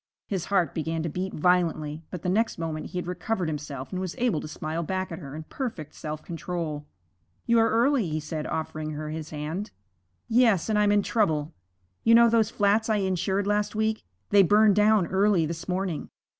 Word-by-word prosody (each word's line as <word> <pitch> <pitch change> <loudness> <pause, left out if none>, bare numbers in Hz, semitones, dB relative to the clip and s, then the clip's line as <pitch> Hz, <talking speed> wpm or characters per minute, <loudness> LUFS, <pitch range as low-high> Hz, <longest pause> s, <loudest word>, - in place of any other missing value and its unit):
His 190 -4 -3
heart 180 -7 +1
began 160 0 -2
to 165 - -2
beat 185 +4 -3
violently, 160 -3 +1
but 180 -4 -7
the - - -2
next 220 +5 +1
moment 160 -2 -4
he - - -7
had 180 - -2
recovered 180 +1 -2
himself 145 -3 -5
and 185 -1 -3
was 185 -2 -4
able 235 -10 +1
to - - -6
smile 155 +2 -4
back 185 +2 -3
at 165 - -5
her 140 0 -8
in 160 - -6
perfect 185 - -5
self 155 0 -6
control. 165 -3 -4 0.6
'You 235 0 +4
are 225 - +4
early,' 235 - +2
he 155 0 -1
said, 155 0 -4
offering 155 -1 -3
her 150 +1 -5
his 155 -1 -5
hand. 155 +7 -4 0.6
'Yes, 225 -6 +3
and 210 -1 +2
I'm 205 -1 +4
in 205 -1 +3
trouble. 160 -9 0 0.5
You 230 - +6
know 235 0 +7
those 225 -2 +3
flats 210 +2 +2
I 215 - +3
insured 190 0 0
last 205 +1 0
week 220 0 0 0.3
they 205 -1 +7
burned 205 +2 +5
down 210 -2 +4
early 190 -2 +2
this 165 +1 -5
morning. 180 -3 -2
180 Hz, 200 wpm, -26 LUFS, 155-210 Hz, 0.6 s, know